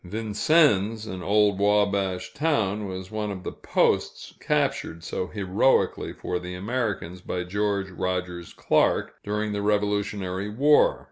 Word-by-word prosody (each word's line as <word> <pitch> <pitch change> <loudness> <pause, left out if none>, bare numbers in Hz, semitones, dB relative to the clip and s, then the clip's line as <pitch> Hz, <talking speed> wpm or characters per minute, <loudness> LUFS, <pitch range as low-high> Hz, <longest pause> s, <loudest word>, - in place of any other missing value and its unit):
Vincennes, 110 - +2
an 95 -4 -6
old 100 0 +2
Wabash 100 -2 +1
town, 110 -10 0
was 95 0 -7
one 105 -1 -3
of 95 -2 -6
the - - -4
posts - - 0
captured 85 +1 -1
so 90 - -3
heroically 100 +6 +1
for 90 - -4
the 90 0 -7
Americans 100 -4 -3
by 90 0 -3
George 100 +1 -1
Rogers 90 -1 -3
Clark, - - +1
during 105 +1 -2
the 100 0 -2
Revolutionary 105 -2 -1
War. 145 +8 +4
100 Hz, 130 wpm, -25 LUFS, 95-105 Hz, -, War